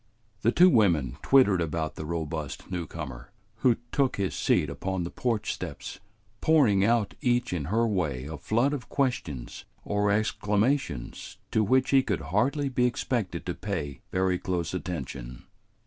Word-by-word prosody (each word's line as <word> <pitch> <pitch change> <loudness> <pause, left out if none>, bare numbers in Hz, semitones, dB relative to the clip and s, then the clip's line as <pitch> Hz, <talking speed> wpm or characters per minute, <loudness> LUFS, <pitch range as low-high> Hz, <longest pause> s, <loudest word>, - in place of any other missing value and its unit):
The 115 - +3
two 180 +7 +6
women 80 - +3
twittered 105 -10 +5
about 80 -1 -2
the 80 - -7
robust 80 -3 -4
newcomer, 75 -8 -5 0.3
who 125 -3 +4 0.2
took 135 -3 +1
his 100 -2 -1
seat 75 - +2
upon 90 +6 -3
the 85 - -5
porch 110 -4 -1
steps, - - -7 0.4
pouring 125 -12 +4
out 115 -1 +2
each 120 -3 +1
in 80 -6 -2
her 115 +8 +2
way 80 - -1
a 80 +2 -6
flood 120 - +1
of 140 -4 -5
questions 100 - -2 0.2
or 105 0 +1
exclamations 105 - 0
to 110 - +3
which 130 +5 +2
he 135 -1 +6
could 105 -7 -2
hardly 140 +7 +2
be 125 -2 +2
expected 115 -7 -2
to 90 - -2
pay 80 -10 -4
very 90 -1 +1
close 85 -2 -2
attention. 70 -9 -5
100 Hz, 150 wpm, -27 LUFS, 80-120 Hz, 0.4 s, two